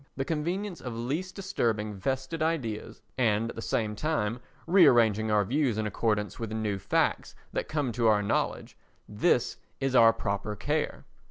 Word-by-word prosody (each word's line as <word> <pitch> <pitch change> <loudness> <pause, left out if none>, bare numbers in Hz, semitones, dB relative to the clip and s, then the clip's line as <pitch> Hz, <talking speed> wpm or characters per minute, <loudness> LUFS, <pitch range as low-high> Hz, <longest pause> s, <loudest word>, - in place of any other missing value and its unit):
The 135 - -1
convenience 175 +5 -2
of 125 -3 -5
least 145 +11 -3
disturbing 115 - -1
vested 130 - -3
ideas, 125 -11 -2 0.2
and 115 -1 +2
at - - -13
the 115 - -5
same 110 -2 -1
time 120 -5 -1 0.3
rearranging 120 - +5
our 105 -1 +3
views 130 -1 +1
in 110 - -1
accordance 105 0 -1
with 115 -2 -4
new 110 -3 -2
facts - - 0 0.2
that - - -2
come 145 -5 -1
to 115 0 +1
our 105 -1 +4
knowledge, 100 - -1 0.3
this 120 +4 +1 0.2
is 135 -1 -1
our 115 -2 +8
proper 105 -1 -3
care. - - -2
115 Hz, 160 wpm, -28 LUFS, 105-150 Hz, 0.3 s, our